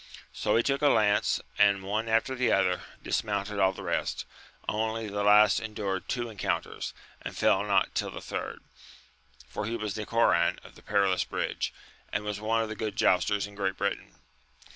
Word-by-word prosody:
So 105 0 0
he 115 - +4
took 140 0 0
a 145 - +5
lance, 105 -6 +3 0.2
and 100 -1 +4
one 110 +4 -2
after 115 +4 +2
the 125 -1 +1
other, 90 -2 +2 0.2
dismounted 105 -1 -1
all 95 -1 +4
the 95 - -9
rest; - - -2 0.4
only 110 +1 -1
the 100 0 -3
last 105 -1 +6
endured 100 -4 -4
two 120 -1 -1
encounters, 110 -3 -3 0.3
and - - -7
fell - - +3
not - - +2
till - - -1
the - - -7
third, - - -5 0.9
for 105 - -4
he 115 - -2
was 105 -3 -3
Nicoran 115 +2 +2
of - - -14
the - - -16
Perilous 100 -3 +2
Bridge, - - -2 0.4
and 100 - -1
was 105 -1 -4
one 115 +1 +1
of 110 - -5
the 110 - -4
good 105 -2 -3
jousters 100 -1 +2
in 105 - -11
Great 95 -2 -2
Britain. 100 +1 -3
105 Hz, 180 wpm, -28 LUFS, 100-110 Hz, 0.9 s, last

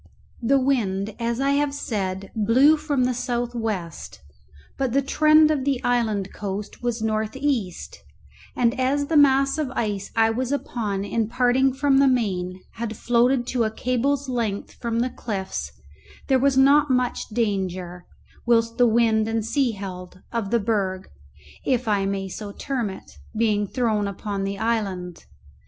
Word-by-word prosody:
The 265 +4 +3
wind, 215 -7 0
as 235 +1 -1
I 275 +1 +2
have 285 0 +1
said, 195 -7 -3
blew 240 +8 +5
from 300 -4 -1
the 250 0 +1
south 240 0 -2
west, 205 - -4 0.6
but 265 -3 -1
the 275 - +3
trend 310 +2 +5
of 285 -4 0
the 275 -2 0
island 220 -5 0
coast 200 0 -5
was 240 -2 -2
north 215 0 -1
east 265 -10 -2 0.6
and 245 +1 +1
as 275 +3 +1
the 320 - -2
mass 275 0 +4
of 300 -4 -1
ice 205 -3 -2
I 225 0 +4
was 250 +3 -2
upon 210 -8 -2
in 225 +1 -1
parting 255 +2 +3
from 275 +1 +2
the 275 - +5
main 185 -7 -1
had 225 -2 -4
floated 245 +1 +2
to 245 -2 +2
a 220 - +1
cable's 255 +5 -1
length 230 -6 -2
from 230 -1 -2
the 250 +1 -1
cliffs, 190 - -4 0.6
there 265 -1 +4
was 275 0 +2
not 280 +2 +5
much 250 -1 0
danger, 185 -5 -2 0.4
whilst 230 0 +2
the 245 - +6
wind 220 -1 +3
and 225 -1 -1
sea 245 0 +1
held, 185 -2 -8
of 230 -4 -2
the 235 - +2
berg 195 -4 -1 0.5
(if 250 -2 0
I 200 -2 +1
may 195 -1 -2
so 205 +2 -7
term 240 0 -3
it) 190 - -11 0.2
being 210 -2 +1
thrown 220 -3 0
upon 200 0 -4
the 195 0 -3
island. 195 -6 -2
230 Hz, 160 wpm, -23 LUFS, 200-260 Hz, 0.6 s, the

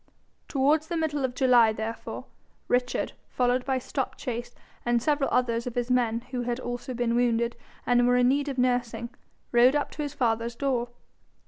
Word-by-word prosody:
Towards 295 +3 +2
the 340 - -2
middle 300 -3 -1
of 255 -1 -1
July, 245 -4 +5
therefore, 220 +1 -5 0.4
Richard, 250 0 0 0.2
followed 250 0 +1
by 265 -1 +1
Stopchase, 245 -1 -4 0.3
and 240 0 +2
several 290 +2 +1
others 235 -1 +1
of 245 - -5
his 245 0 -1
men 235 -2 +2
who 250 -2 -2
had 240 0 -2
also 245 0 -5
been 235 -1 0
wounded 235 -1 +1 0.3
and 245 0 +4
were 245 0 +4
in 245 0 +4
need 285 +2 +1
of 270 - -4
nursing, 245 -2 0 0.4
rode 245 +3 +5
up 290 - 0
to - - -6
his 290 0 -4
father's 230 -1 0
door. 245 -3 -1
245 Hz, 175 wpm, -27 LUFS, 235-265 Hz, 0.4 s, July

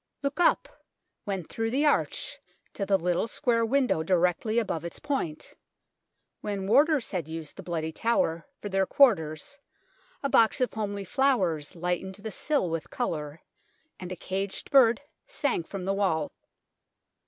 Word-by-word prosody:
Look 280 +4 -2
up, 350 - +4 0.6
when 195 -3 -2
through 225 +7 -3
the 275 +6 +1
arch, 295 - 0 0.3
to 200 - -3
the 195 - +4
little 180 +3 0
square 230 -1 +1
window 250 -7 +2
directly 180 +5 +1
above 195 -8 0
its 170 - -6
point. 265 - -3 0.9
When 200 -2 -3
warders 280 +5 +3
had 175 -6 -2
used 160 -1 -6
the - - -8
Bloody 160 -2 -3
Tower 195 - 0
for - - -5
their 195 -1 +1
quarters 235 - +3 0.6
a - - +2
box 230 -1 +4
of 255 - +1
homely 205 -2 -3
flowers 185 - +1
lightened 180 +2 -2
the 205 +2 -7
sill 290 -2 0
with 165 -1 -3
colour, 150 0 -3 0.6
and 180 -1 -7
a - - -3
caged 195 +2 -4
bird 245 -3 +6 0.3
sang 290 - 0
from 185 +2 -7
the 195 - +1
wall. 175 -7 0
195 Hz, 150 wpm, -28 LUFS, 170-245 Hz, 0.9 s, bird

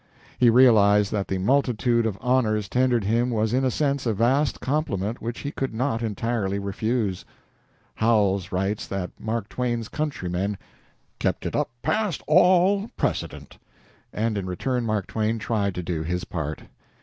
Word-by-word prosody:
He 125 - +6
realized 105 -5 +5
that 100 -2 -1
the 95 - -1
multitude 120 +1 +2
of 100 -3 -3
honors 110 -5 +1
tendered 125 -2 +2
him 115 +5 +1
was 110 -1 0
in 130 +1 +2
a 130 - +3
sense 140 0 0
a 110 - +1
vast 130 +7 +2
compliment 120 - -2
which 120 +1 -5
he 145 - -4
could 135 -5 -3
not 120 -1 -1
entirely 110 -2 -1
refuse. 100 0 -2 0.7
Howells 100 -5 +1
writes 95 +3 -1
that 95 -2 -4
Mark 110 -1 -3
Twain's 120 -3 -2
countrymen 100 - -2 0.6
"kept - - -1
it - - -3
up - - 0
past 185 +1 0
all 185 +5 +4
precedent," - - -3 0.5
and 110 -1 -1
in 95 - -5
return 120 +6 -2
Mark 105 -3 0
Twain 110 +1 -1
tried 105 -3 -1
to 90 - -4
do 85 -2 -2
his 90 +3 -2
part. 80 -3 -5
115 Hz, 155 wpm, -24 LUFS, 100-125 Hz, 0.7 s, He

